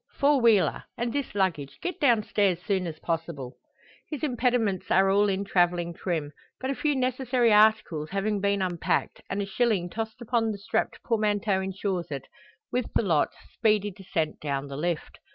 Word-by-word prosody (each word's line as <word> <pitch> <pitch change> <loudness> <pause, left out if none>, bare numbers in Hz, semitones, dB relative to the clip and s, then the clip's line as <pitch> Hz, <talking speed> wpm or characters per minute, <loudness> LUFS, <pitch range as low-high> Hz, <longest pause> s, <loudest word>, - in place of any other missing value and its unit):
four 280 -1 +4
wheeler. 225 -5 +4
And 240 0 -2
this 280 -7 -3
luggage; 170 -8 -1
get 360 - -4
down 240 -7 +4
stairs 200 -4 +2
soon 190 -3 0
as 160 -2 -6
possible." 160 -6 -4 0.5
His 300 -3 -5
impediments 245 - 0
are 195 +1 +4
all 205 +1 +4
in 195 +1 -1
travelling 175 -2 +1
trim 160 -4 -3 0.3
but 260 +1 -2
a - - 0
few 295 +1 0
necessary 255 -2 +2
articles 210 -8 +3
having 200 +1 -1
been 200 -1 +1
unpacked, 175 -3 -1
and 200 +1 -1
a - - -3
shilling 195 -4 0
tossed 220 0 -4
upon 235 -1 0
the 205 - -5
strapped 220 +2 -2
portmanteau 210 -3 +1
ensures 190 -2 -3
it, 140 -3 -5 0.5
with 250 -1 -1
the - - +3
lot, 165 -7 +2 0.2
speedy 210 -2 +2
descent 175 -5 -3
down 140 -1 -3
the 140 - -6
lift. 170 +2 -3
200 Hz, 170 wpm, -27 LUFS, 175-230 Hz, 0.5 s, four